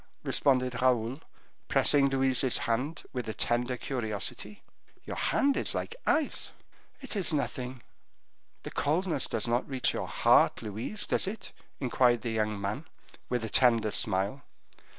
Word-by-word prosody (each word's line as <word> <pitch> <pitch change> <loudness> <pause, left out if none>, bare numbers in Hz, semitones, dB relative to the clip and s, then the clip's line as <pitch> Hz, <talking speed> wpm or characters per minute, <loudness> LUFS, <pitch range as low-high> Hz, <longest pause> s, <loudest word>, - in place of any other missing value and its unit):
responded 125 -3 +1
Raoul, 125 +2 +1 0.5
pressing 140 -1 +4
Louise's 130 -1 +3
hand 130 +8 -1
with 125 -3 -4
a 110 - -4
tender 120 +1 0
curiosity. 120 - -3 0.4
"Your - - -6
hand 280 0 +2
is - - +1
like 460 - -3
ice." 310 -2 +1 0.5
"It 265 -4 -5
is 190 -3 +2
nothing." 130 -4 -3 0.8
"This - - -7
coldness 160 0 0
does - - -1
not 120 +3 0
reach 130 -2 0
your - - -3
heart, - - +3
Louise, 110 - -2
does - - 0
it?" 205 +1 -5 0.3
inquired 125 -2 +2
the 115 - -3
young 110 -2 -1
man, 105 +10 -3 0.4
with 125 -2 -1
a - - -5
tender 115 -2 +4
smile. 100 +7 0
125 Hz, 140 wpm, -29 LUFS, 115-140 Hz, 0.8 s, pressing